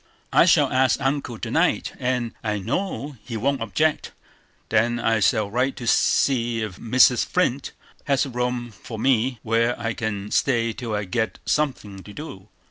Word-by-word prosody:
"I -, -, +6 dB
shall -, -, +4 dB
ask 130 Hz, 0 st, +3 dB
Uncle 135 Hz, -3 st, -2 dB
to -, -, -5 dB
night, -, -, +1 dB
and 125 Hz, -2 st, -1 dB
I 105 Hz, -2 st, -1 dB
know 145 Hz, -, -3 dB
he 115 Hz, -3 st, -5 dB
won't 135 Hz, +4 st, 0 dB
object. 150 Hz, +8 st, 0 dB, 0.6 s
Then 115 Hz, +2 st, +2 dB
I 115 Hz, -1 st, +1 dB
shall 105 Hz, 0 st, +1 dB
write 130 Hz, +4 st, 0 dB
to 120 Hz, -, -7 dB
see 115 Hz, -1 st, +2 dB
if 100 Hz, -4 st, -6 dB
Mrs. 125 Hz, +1 st, +4 dB
Flint 140 Hz, -7 st, -1 dB, 0.3 s
has 140 Hz, -1 st, +2 dB
a 135 Hz, -, -7 dB
room 125 Hz, -1 st, -2 dB
for 110 Hz, +1 st, -9 dB
me, 125 Hz, +1 st, +1 dB
where 115 Hz, +2 st, +1 dB
I 115 Hz, 0 st, -2 dB
can 105 Hz, -3 st, -4 dB
stay 115 Hz, -4 st, +1 dB
till 115 Hz, -2 st, -4 dB
I 105 Hz, -, -1 dB
get 110 Hz, +4 st, -2 dB
something 115 Hz, -10 st, -1 dB
to 105 Hz, -, -12 dB
do. 105 Hz, -10 st, -9 dB
120 Hz, 170 wpm, -23 LUFS, 110-130 Hz, 0.6 s, I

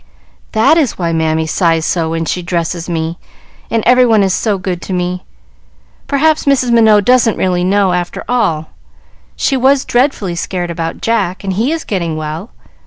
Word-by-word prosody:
"That 225 Hz, +9 st, +4 dB
is 280 Hz, -8 st, 0 dB
why 170 Hz, -2 st, -1 dB
Mammy 160 Hz, 0 st, 0 dB
sighs 165 Hz, -1 st, +1 dB
so 165 Hz, -2 st, 0 dB
when 165 Hz, 0 st, -2 dB
she 180 Hz, -, -2 dB
dresses 170 Hz, 0 st, -3 dB
me, 165 Hz, 0 st, -3 dB, 0.5 s
and 225 Hz, -2 st, 0 dB
every 250 Hz, +1 st, +5 dB
one 225 Hz, -4 st, +4 dB
is 190 Hz, -1 st, +1 dB
so 210 Hz, -1 st, 0 dB
good 180 Hz, -2 st, -4 dB
to 190 Hz, -, -5 dB
me. 180 Hz, 0 st, -2 dB, 0.8 s
Perhaps 310 Hz, +3 st, +1 dB
Mrs. 260 Hz, -3 st, +2 dB
Minot 220 Hz, -3 st, +4 dB
doesn't 245 Hz, -2 st, +3 dB
really 180 Hz, -1 st, 0 dB
know, 195 Hz, 0 st, +2 dB
after 175 Hz, -1 st, -3 dB
all. 165 Hz, -11 st, -1 dB, 0.6 s
She 275 Hz, -, 0 dB
was 265 Hz, +1 st, +2 dB
dreadfully 240 Hz, -7 st, 0 dB
scared 175 Hz, 0 st, -3 dB
about 165 Hz, -1 st, -4 dB
Jack, 205 Hz, -5 st, -1 dB
and 195 Hz, -1 st, -2 dB
he 225 Hz, +9 st, 0 dB
is 325 Hz, 0 st, -2 dB
getting 170 Hz, -6 st, -3 dB
well. 155 Hz, 0 st, -5 dB
185 Hz, 175 wpm, -14 LUFS, 170-235 Hz, 0.8 s, every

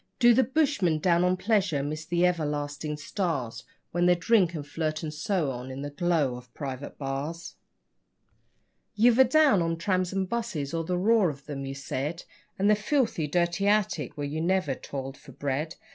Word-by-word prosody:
Do 240 Hz, -1 st, +6 dB
the 260 Hz, -, +4 dB
bushmen, 260 Hz, -, +1 dB
down 170 Hz, +2 st, +2 dB
on 180 Hz, 0 st, +2 dB
pleasure, 190 Hz, -8 st, +1 dB
miss 155 Hz, +2 st, -4 dB
the 175 Hz, +2 st, +2 dB
everlasting 150 Hz, -3 st, -2 dB
stars 140 Hz, -, -3 dB, 0.3 s
When 175 Hz, +1 st, +2 dB
they 180 Hz, -, +5 dB
drink 175 Hz, -1 st, +2 dB
and 145 Hz, -2 st, -5 dB
flirt 155 Hz, +1 st, -3 dB
and 155 Hz, -1 st, -4 dB
so 155 Hz, -1 st, -1 dB
on 125 Hz, +1 st, -6 dB
in 135 Hz, +1 st, -6 dB
the 145 Hz, -, -5 dB
glow 150 Hz, -4 st, +1 dB
of 125 Hz, -1 st, -14 dB
private 140 Hz, -1 st, -6 dB
bars? 145 Hz, +5 st, -4 dB, 1.4 s
You've 235 Hz, +3 st, +4 dB
a -, -, +10 dB
down 270 Hz, -, +4 dB
on 165 Hz, 0 st, -1 dB
'trams 185 Hz, +1 st, 0 dB
and 190 Hz, -1 st, -1 dB
buses', 185 Hz, -10 st, -3 dB
or 165 Hz, 0 st, -1 dB
the 180 Hz, +2 st, -1 dB
'roar' 210 Hz, 0 st, +3 dB
of 140 Hz, -2 st, -9 dB
'em, 140 Hz, -2 st, -5 dB
you 135 Hz, -, -5 dB
said, 140 Hz, +4 st, -4 dB, 0.3 s
And 195 Hz, -, +2 dB
the 210 Hz, -, +6 dB
'filthy, 215 Hz, -, 0 dB
dirty 175 Hz, +5 st, 0 dB
attic', 200 Hz, -, +1 dB
where 145 Hz, -, -2 dB
you 150 Hz, +3 st, -3 dB
never 180 Hz, -4 st, +1 dB
toiled 135 Hz, +1 st, -6 dB
for 140 Hz, -3 st, -14 dB
bread. 145 Hz, +5 st, -3 dB
165 Hz, 185 wpm, -27 LUFS, 145-190 Hz, 1.4 s, a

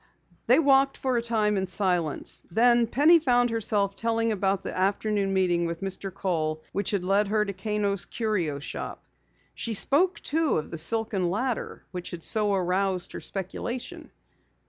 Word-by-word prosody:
They 250 Hz, -, +6 dB
walked 275 Hz, -3 st, +4 dB
for 260 Hz, -1 st, -1 dB
a 235 Hz, -, +1 dB
time 215 Hz, -3 st, 0 dB
in 190 Hz, 0 st, -1 dB
silence. 180 Hz, -5 st, 0 dB
Then 235 Hz, +4 st, +4 dB
Penny 305 Hz, +8 st, +5 dB
found 245 Hz, -5 st, +2 dB
herself 205 Hz, -3 st, 0 dB
telling 230 Hz, 0 st, 0 dB
about 195 Hz, -1 st, 0 dB
the -, -, -5 dB
afternoon 200 Hz, +1 st, 0 dB
meeting 175 Hz, -3 st, +1 dB
with 165 Hz, 0 st, -5 dB
Mr. 195 Hz, 0 st, -5 dB
Kohl 155 Hz, -5 st, -2 dB
which 200 Hz, -1 st, -2 dB
had 200 Hz, -3 st, -1 dB
led 200 Hz, +3 st, +2 dB
her 210 Hz, +1 st, +1 dB
to 200 Hz, -, -4 dB
Kano's 200 Hz, 0 st, -2 dB
Curio 190 Hz, -11 st, -2 dB
Shop. 140 Hz, -, -7 dB, 0.5 s
She 230 Hz, -2 st, -3 dB
spoke, 335 Hz, -, +3 dB
too, 320 Hz, 0 st, 0 dB
of 155 Hz, -, -4 dB
the 165 Hz, -, -4 dB
silken 195 Hz, +1 st, +1 dB
ladder 235 Hz, +6 st, -3 dB
which 180 Hz, -1 st, -6 dB
had 170 Hz, -2 st, -8 dB
so 210 Hz, -2 st, +2 dB
aroused 185 Hz, 0 st, -1 dB
her -, -, -6 dB
speculation. 200 Hz, +6 st, -5 dB
200 Hz, 165 wpm, -26 LUFS, 185-230 Hz, 0.5 s, They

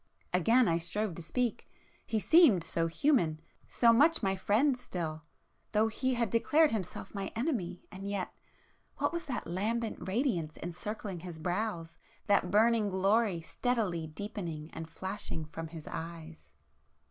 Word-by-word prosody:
Again 225 Hz, +7 st, +4 dB
I 165 Hz, 0 st, +2 dB
strove 190 Hz, +4 st, -2 dB
to 175 Hz, -, -8 dB
speak,—he 225 Hz, +2 st, -3 dB
seemed 270 Hz, -, +6 dB
so 165 Hz, 0 st, +1 dB
human,—so 170 Hz, -, +2 dB
much 310 Hz, +7 st, +4 dB
my 195 Hz, 0 st, +2 dB
friend 225 Hz, +9 st, +2 dB
still, 165 Hz, -10 st, -4 dB, 0.5 s
though 220 Hz, +1 st, +3 dB
he 260 Hz, +3 st, 0 dB
had 235 Hz, -4 st, 0 dB
declared 305 Hz, +7 st, +4 dB
himself 200 Hz, -6 st, -4 dB
my 195 Hz, -2 st, -3 dB
Enemy,——and 195 Hz, -, -3 dB
yet... 200 Hz, -3 st, -3 dB, 0.6 s
what -, -, 0 dB
was 340 Hz, -2 st, -4 dB
that 250 Hz, -4 st, -3 dB
lambent 220 Hz, +6 st, -2 dB
radiance 190 Hz, -, 0 dB
encircling 185 Hz, +2 st, -5 dB
his 175 Hz, -1 st, -8 dB
brows?—that 180 Hz, +1 st, -2 dB
burning 220 Hz, +1 st, +4 dB
glory 195 Hz, -1 st, +2 dB
steadily 185 Hz, -3 st, -1 dB
deepening 165 Hz, -3 st, -6 dB
and 160 Hz, 0 st, -6 dB
flashing 190 Hz, -2 st, -5 dB
from 165 Hz, +1 st, -7 dB
his 160 Hz, -1 st, -9 dB
eyes? 165 Hz, -1 st, -7 dB
195 Hz, 130 wpm, -31 LUFS, 170-230 Hz, 0.6 s, seemed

